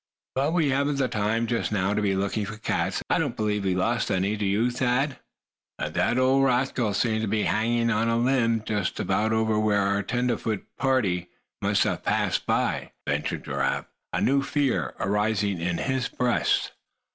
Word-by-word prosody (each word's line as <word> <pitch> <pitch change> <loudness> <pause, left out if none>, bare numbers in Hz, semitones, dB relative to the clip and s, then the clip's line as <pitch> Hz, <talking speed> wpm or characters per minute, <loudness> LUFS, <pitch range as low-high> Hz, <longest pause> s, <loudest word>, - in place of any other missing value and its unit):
But 140 +5 0
we 160 -5 +2
haven't 140 +2 +1
the 135 -2 +1
time 110 +1 0
just 115 -1 -1
now 100 -1 +1
to 105 - 0
be 100 -2 +1
looking 100 +2 -1
for 105 +1 -7
cats. 110 - -1
I - - +2
don't - - -1
believe 105 -2 -1
we've 95 -1 +1
lost 115 +6 0
any, 95 +3 +1
do 105 -1 -1
you, 110 +5 +2
Thad?" 130 +3 0 0.6
"But - - -4
that 120 - +1
old 130 +1 +4
rascal 125 -4 +1
seemed 110 -1 +1
to 110 - -1
be 105 +1 0
hanging 115 +3 +1
on 115 +1 +1
a 115 - +2
limb 115 -3 +2
just 105 -4 -2
about 110 +1 +1
over 110 -1 +1
where 105 -1 +2
our 100 +1 +1
tenderfoot 115 -1 -1
pard 100 -10 +1 0.3
must - - +2
have - - -1
passed - - 0
by," - - 0
ventured - - -2
Giraffe, 70 0 -1 0.3
a - - -1
new 140 +1 +3
fear 140 -2 0
arising 105 -2 0
in 90 0 -1
his 130 -2 -1
breast. 125 -1 +1
110 Hz, 180 wpm, -26 LUFS, 100-125 Hz, 0.6 s, old